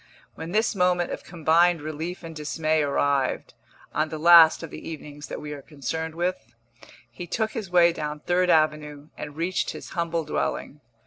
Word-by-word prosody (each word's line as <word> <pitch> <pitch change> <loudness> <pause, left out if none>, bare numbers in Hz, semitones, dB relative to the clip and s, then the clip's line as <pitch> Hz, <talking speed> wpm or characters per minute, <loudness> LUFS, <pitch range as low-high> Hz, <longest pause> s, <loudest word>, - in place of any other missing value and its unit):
When 160 +1 -7
this 215 +3 +1
moment 180 -2 +1
of - - -5
combined 170 0 +2
relief 155 +4 -6
and 165 -1 -8
dismay 155 +1 0
arrived 140 -2 0 0.4
(on 155 +1 0
the 155 - -5
last 165 0 +7
of 165 - -7
the - - -8
evenings 150 -2 -9
that - - -6
we 150 0 -6
are 145 - -8
concerned 160 +3 -5
with), 170 -10 -3 0.6
he 175 +9 -8
took 220 +4 -1
his 215 -7 -5
way 175 -1 +5
down 150 -2 -5
Third 180 +2 +1
Avenue 150 -2 +1
and 145 -1 -8
reached 175 +3 -1
his - - -9
humble 170 -2 -2
dwelling. 150 0 -3
160 Hz, 175 wpm, -25 LUFS, 150-175 Hz, 0.6 s, last